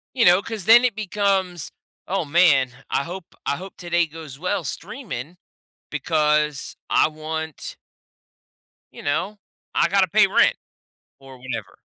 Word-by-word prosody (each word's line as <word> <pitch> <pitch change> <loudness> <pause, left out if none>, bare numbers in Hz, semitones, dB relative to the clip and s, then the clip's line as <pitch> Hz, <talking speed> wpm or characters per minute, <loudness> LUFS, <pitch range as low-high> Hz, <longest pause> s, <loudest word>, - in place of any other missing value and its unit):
You 240 - +4
know? 180 +2 +6
'Cause 215 -3 -5
then 240 +2 +8
it 240 -5 +1
becomes, 195 -5 0 0.4
"Oh 190 -2 -1
man, 135 -6 +3
I - - +1
hope 175 +2 -9
I 140 - 0
hope 190 +1 -10
today 175 -1 +1
goes 155 -3 -10
well 180 0 -1
streaming 175 - -6 0.5
because 150 -1 0
I - - +4
want" 160 0 -5 1.2
you - - -10
know, 190 +8 -2 0.3
"I - - +3
gotta 195 -1 +3
pay 210 +3 +5
rent," 190 - +4 0.7
or 135 -1 -13
whenever. 115 -7 -6
170 Hz, 135 wpm, -23 LUFS, 150-195 Hz, 1.2 s, then